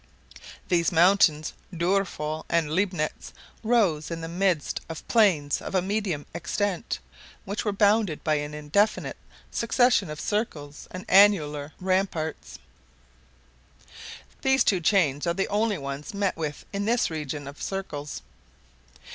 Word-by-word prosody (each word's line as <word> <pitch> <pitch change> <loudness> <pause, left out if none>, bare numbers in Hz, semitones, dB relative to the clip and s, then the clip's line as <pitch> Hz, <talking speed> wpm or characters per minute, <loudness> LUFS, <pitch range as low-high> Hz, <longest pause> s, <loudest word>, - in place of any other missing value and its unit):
These 170 -1 +2
mountains 165 -3 +4 0.2
of 175 - -8
Doerful 170 -4 -1
and 165 -3 +1
Leibnitz 180 -4 -1 0.3
rose 210 -10 +2
in 165 -1 -5
the 165 - -4
midst 175 -2 0
of 165 - -8
plains 175 -11 +3
of - - -5
a 185 - +4
medium 195 -6 -2
extent, 185 +4 -2 0.5
which 200 +2 -3
were 210 - 0
bounded 205 -4 +2
by 155 - +2
an 145 0 -4
indefinite 175 +9 0 0.3
succession 235 -5 +2
of 150 0 -6
circles 155 -9 -3
and 185 0 -8
annular 155 -7 +4
ramparts. 180 - -1 1.8
These 265 0 +4
two 190 - +2
chains 160 -4 +2
are 170 - +1
the 195 - 0
only 210 0 +1
ones 140 +5 -6
met 200 -2 0
with 155 -3 -5
in 200 0 -2
this 235 -4 +1
region 150 -2 -4
of 140 +1 -10
circles. 150 -7 -5
175 Hz, 130 wpm, -26 LUFS, 150-200 Hz, 1.8 s, mountains